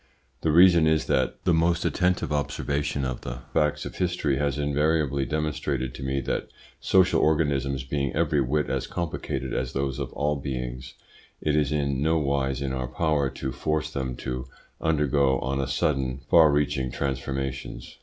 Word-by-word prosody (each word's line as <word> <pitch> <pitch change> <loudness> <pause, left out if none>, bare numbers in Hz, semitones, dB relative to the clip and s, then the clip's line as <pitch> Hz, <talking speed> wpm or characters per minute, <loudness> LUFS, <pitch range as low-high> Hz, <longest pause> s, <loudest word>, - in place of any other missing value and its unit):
The 80 - +1
reason 85 -1 +6
is, 80 0 +2
that 65 - 0
the 90 -2 +3
most 85 +1 +2
attentive 90 -4 +1
observation 70 -1 -1
of 65 -2 -3
the 60 0 -6
facts 75 -1 +1
of - - -7
history 85 -6 0
has 70 -1 0
invariably 75 -1 +1
demonstrated 75 -4 -2
to - - -9
me 65 0 -1
that - - -2 0.3
social 95 -1 +3
organisms 70 -4 +1
being 70 0 -1
every 75 -2 +2
whit 75 +4 0
as - - -2
complicated 65 -6 -3
as 65 0 -2
those 70 0 -2
of 70 - -4
all 75 0 0
beings, 65 -2 -5 0.4
it 75 -1 0
is 75 -2 +2
in 70 -3 0
no 80 +2 +2
wise 70 -2 0
in 65 -1 -2
our 65 -1 -2
power 70 +1 0
to 65 - -5
force 75 +3 -2
them 65 -2 -3
to 65 +1 -5 0.3
undergo 75 -3 +2
on 70 +2 -1
a 65 - -2
sudden 65 -3 0
far 80 -3 +7
reaching 70 -3 0
transformations. 65 -1 -4
70 Hz, 165 wpm, -26 LUFS, 65-75 Hz, 0.4 s, far